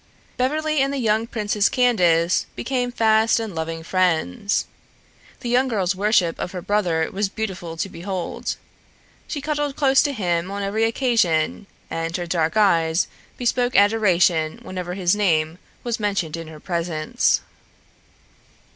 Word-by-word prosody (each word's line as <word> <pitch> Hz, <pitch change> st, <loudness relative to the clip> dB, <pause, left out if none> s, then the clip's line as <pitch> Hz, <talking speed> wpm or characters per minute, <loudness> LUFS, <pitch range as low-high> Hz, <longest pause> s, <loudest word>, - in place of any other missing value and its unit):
Beverly 305 Hz, +4 st, 0 dB
and 275 Hz, 0 st, +1 dB
the 280 Hz, -, -2 dB
young 225 Hz, -2 st, +1 dB
Princess 210 Hz, -2 st, +1 dB
Candace 180 Hz, -9 st, +3 dB
became 250 Hz, -2 st, -2 dB
fast 220 Hz, -1 st, +3 dB
and 220 Hz, -4 st, -4 dB
loving 165 Hz, 0 st, -4 dB
friends. 180 Hz, -, 0 dB, 0.8 s
The 240 Hz, -, -4 dB
young 255 Hz, +2 st, +3 dB
girl's 200 Hz, -6 st, 0 dB
worship 190 Hz, -3 st, +1 dB
of 180 Hz, -, -4 dB
her 180 Hz, -, -4 dB
brother 175 Hz, -6 st, +1 dB
was 200 Hz, 0 st, 0 dB
beautiful 185 Hz, -6 st, -5 dB
to 180 Hz, -, -1 dB
behold. 185 Hz, 0 st, -4 dB, 0.7 s
She 290 Hz, -, -4 dB
huddled 295 Hz, -1 st, -2 dB
close 270 Hz, -2 st, +4 dB
to 290 Hz, -, 0 dB
him 175 Hz, -7 st, -1 dB
on 200 Hz, 0 st, -4 dB
every 215 Hz, +3 st, +1 dB
occasion, 225 Hz, -, +1 dB, 0.2 s
and 165 Hz, +1 st, -2 dB
her 175 Hz, -, -4 dB
dark 165 Hz, +2 st, 0 dB
eyes 165 Hz, -5 st, +3 dB, 0.3 s
bespoke 245 Hz, 0 st, 0 dB
adoration 185 Hz, -6 st, +3 dB
whenever 180 Hz, -1 st, -5 dB
his 185 Hz, 0 st, +2 dB
name 165 Hz, -5 st, +1 dB, 0.2 s
was 235 Hz, -2 st, -2 dB
mentioned 195 Hz, -7 st, -1 dB
in 165 Hz, -1 st, -7 dB
her 155 Hz, -1 st, -11 dB
presence. 165 Hz, -2 st, 0 dB
195 Hz, 140 wpm, -22 LUFS, 170-230 Hz, 0.8 s, close